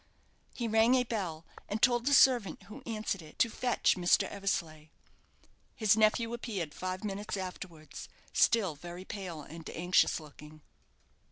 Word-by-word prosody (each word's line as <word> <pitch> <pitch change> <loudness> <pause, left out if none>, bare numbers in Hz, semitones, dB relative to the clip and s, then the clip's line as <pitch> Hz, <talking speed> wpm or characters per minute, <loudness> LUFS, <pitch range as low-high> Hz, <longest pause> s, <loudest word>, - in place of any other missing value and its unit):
He 235 - -2
rang 225 +3 +4
a 255 - +3
bell, 180 -9 -4 0.2
and 210 - -2
told 240 +1 +3
the 285 - +5
servant 245 -7 +4
who 220 +7 -11
answered 215 -4 -3
it 155 -1 -14
to 230 - +2
fetch 250 +1 +1
Mr. 180 +2 +3
Eversleigh. 165 -6 -3 0.9
His 215 -2 +3
nephew 220 +2 +2
appeared 200 -10 -4
five 185 +3 -4
minutes 205 0 -4
afterwards, 180 -4 -8 0.2
still 210 -8 +3
very 175 +4 -9
pale 180 -7 -6
and 160 +3 -10
anxious 175 +1 +2
looking. 150 0 -14
195 Hz, 145 wpm, -31 LUFS, 170-225 Hz, 0.9 s, the